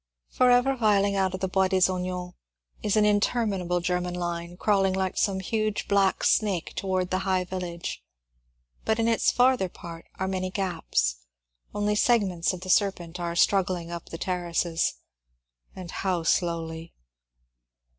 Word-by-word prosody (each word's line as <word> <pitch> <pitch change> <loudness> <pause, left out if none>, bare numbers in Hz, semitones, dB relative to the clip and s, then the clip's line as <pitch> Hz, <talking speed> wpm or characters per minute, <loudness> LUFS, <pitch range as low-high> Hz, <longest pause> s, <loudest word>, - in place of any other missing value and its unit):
Forever 250 +2 +4
filing 205 -3 +3
out 190 -1 +1
of 185 - -8
the 190 - 0
Bois 190 0 +2
des 190 - +1
Ognons 180 -1 -4 0.5
is 210 - 0
an 210 - +5
inter 210 +3 +2
minable 180 -4 -1
German 180 0 -1
line, 175 0 -4
crawling 195 -2 +2
like 190 0 -1
some 195 -2 +1
huge 215 +2 -2
black 195 -1 +2
snake 200 -6 +1
towards 185 -1 -1
the 185 - +1
high 190 -1 0
village, 180 -2 -5 0.8
but 220 - +1
in 230 0 +1
its 230 -1 +3
farther 250 -6 +3
part 170 -2 -10
are 190 - -2
many 185 -1 -2
gaps; 165 - -1 0.6
only 205 0 +1
segments 205 -6 +2
of 185 -2 -7
the 185 - -8
serpent 180 -4 +1
are 170 -1 -3
struggling 180 -2 +1
up 170 -1 -7
the 165 - -6
ter 180 +1 -2
races. 170 -1 0 0.8
And 180 -3 -8
how 180 -3 -1
slowly 165 -1 -1
185 Hz, 155 wpm, -26 LUFS, 175-200 Hz, 0.8 s, an